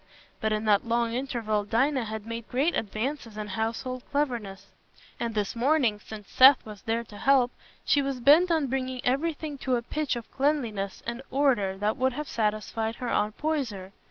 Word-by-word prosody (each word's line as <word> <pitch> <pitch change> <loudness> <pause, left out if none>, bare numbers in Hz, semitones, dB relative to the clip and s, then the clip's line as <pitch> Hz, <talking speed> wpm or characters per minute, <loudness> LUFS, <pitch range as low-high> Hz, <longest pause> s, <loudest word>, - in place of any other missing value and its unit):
But 220 - 0
in 215 +1 -1
that 210 +1 +3
long 235 0 +1
interval 235 -5 -1
Dinah 255 +4 +1
had 215 -1 -6
made 230 0 -6
great 280 +7 +1
advances 225 +1 -3
in 210 -1 -5
household 225 +5 -3
cleverness, 230 -9 -2 0.5
and 230 -1 -3
this 205 0 -1
morning, 245 -4 +2
since 210 -1 -10
Seth 265 +1 +7
was 210 -2 -10
there 230 0 -1
to 210 -2 -13
help, 260 -2 +4 0.3
she 285 - +3
was 275 -2 -2
bent 300 +8 +6
on 320 -3 +2
bringing 260 -1 -2
everything 295 +2 -1
to 255 -1 0
a 235 - -2
pitch 300 +2 -2
of 235 -1 -8
cleanliness 240 -9 -1
and 235 +2 -4
order 245 -9 +1
that 210 +5 0
would 260 0 +1
have 300 +3 -5
satisfied 220 0 -1
her 245 -1 -4
Aunt 210 -1 0
Poyser. 245 -12 -2
235 Hz, 180 wpm, -27 LUFS, 215-275 Hz, 0.5 s, Seth